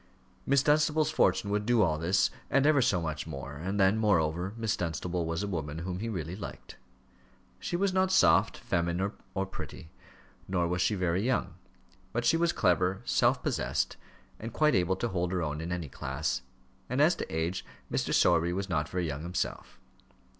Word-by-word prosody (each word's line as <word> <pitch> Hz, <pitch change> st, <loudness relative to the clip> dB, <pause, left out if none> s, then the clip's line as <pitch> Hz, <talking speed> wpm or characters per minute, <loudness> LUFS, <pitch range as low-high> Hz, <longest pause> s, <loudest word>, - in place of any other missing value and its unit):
Miss 140 Hz, -1 st, +4 dB
Dunstable's 155 Hz, +1 st, +3 dB
fortune 100 Hz, -, +2 dB
would 105 Hz, 0 st, +1 dB
do 120 Hz, 0 st, +3 dB
all 80 Hz, -3 st, +1 dB
this 90 Hz, +4 st, +2 dB, 0.2 s
and 135 Hz, +1 st, +3 dB
ever 150 Hz, -2 st, +5 dB
so 105 Hz, -7 st, +2 dB
much 80 Hz, -2 st, -4 dB
more, 70 Hz, +1 st, -7 dB
and 95 Hz, +6 st, -3 dB
then, 95 Hz, +3 st, +4 dB
moreover, 90 Hz, -3 st, +1 dB
Miss 110 Hz, -2 st, 0 dB
Dunstable 85 Hz, 0 st, -2 dB
was 85 Hz, +3 st, -2 dB
a -, -, -2 dB
woman 80 Hz, -5 st, -4 dB
whom 90 Hz, +2 st, -4 dB
he 115 Hz, +3 st, -3 dB
really 90 Hz, -4 st, -4 dB
liked. 100 Hz, -, -8 dB, 0.8 s
She -, -, -3 dB
was 190 Hz, +1 st, +1 dB
not 185 Hz, 0 st, +2 dB
soft, -, -, +4 dB
feminine, 85 Hz, +3 st, -1 dB, 0.2 s
or 95 Hz, 0 st, 0 dB
pretty, 90 Hz, -3 st, -9 dB, 0.6 s
nor 90 Hz, -2 st, +1 dB
was 90 Hz, +1 st, -1 dB
she 105 Hz, -, +2 dB
very 90 Hz, -1 st, 0 dB
young; 115 Hz, -6 st, 0 dB, 0.6 s
but 120 Hz, +1 st, -1 dB
she 120 Hz, -, +4 dB
was 170 Hz, +1 st, +2 dB
clever, 90 Hz, +2 st, +1 dB
self -, -, +2 dB
possessed, -, -, -1 dB, 0.4 s
and 115 Hz, +2 st, -6 dB
quite 155 Hz, +5 st, +3 dB
able 90 Hz, 0 st, +2 dB
to 120 Hz, +5 st, -2 dB
hold 90 Hz, -2 st, -1 dB
her 90 Hz, -2 st, 0 dB
own 75 Hz, 0 st, -3 dB
in 85 Hz, +2 st, -4 dB
any 85 Hz, -3 st, -3 dB
class; 70 Hz, +3 st, -3 dB, 0.5 s
and 125 Hz, +3 st, -1 dB
as 155 Hz, +4 st, +5 dB
to -, -, -5 dB
age, 80 Hz, +3 st, -2 dB, 0.3 s
Mr. -, -, -1 dB
Sowerby 85 Hz, 0 st, +3 dB
was 95 Hz, +1 st, -2 dB
not 75 Hz, -4 st, 0 dB
very 90 Hz, -1 st, -1 dB
young 75 Hz, -2 st, -4 dB
himself. 85 Hz, +2 st, -4 dB
90 Hz, 185 wpm, -30 LUFS, 85-115 Hz, 0.8 s, ever